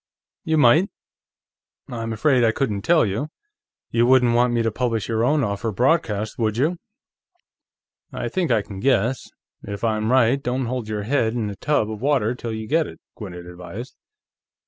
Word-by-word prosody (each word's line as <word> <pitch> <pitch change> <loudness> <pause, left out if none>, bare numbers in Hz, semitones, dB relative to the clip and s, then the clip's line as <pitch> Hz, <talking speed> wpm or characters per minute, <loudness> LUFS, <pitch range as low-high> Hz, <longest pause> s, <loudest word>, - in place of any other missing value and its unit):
"You 160 0 +1
might; 150 +8 +5 1.0
I'm 115 -1 -4
afraid 125 +3 +2
I 115 - +4
couldn't 110 -5 -2
tell 165 +4 +4
you. 110 +8 -2 0.6
You 120 +1 +3
wouldn't 125 -2 +5
want 120 +1 +3
me 120 -1 +1
to 115 - 0
publish 115 -2 -1
your 115 -1 0
own 145 +3 +2
offer 105 +1 -2
broadcast, 110 - 0
would 110 -1 0
you?" 160 +7 0 1.3
"I - - -4
think 185 -5 -1
I 110 -4 +2
can 100 -2 -9
guess. 125 0 +1 0.3
If 100 +1 -7
I'm 110 0 0
right, 130 +1 +3
don't 125 0 -1
hold 120 -2 -3
your 105 -1 -3
head 115 -1 0
in 110 -4 -2
a - - -7
tub 110 -3 0
of 110 -1 -7
water 130 -5 +1
till 120 -2 -6
you 110 0 -5
get 160 +3 +2
it," - - -11 0.2
Gwinnett 90 -5 -8
advised. 90 +8 -9
115 Hz, 175 wpm, -22 LUFS, 110-130 Hz, 1.3 s, might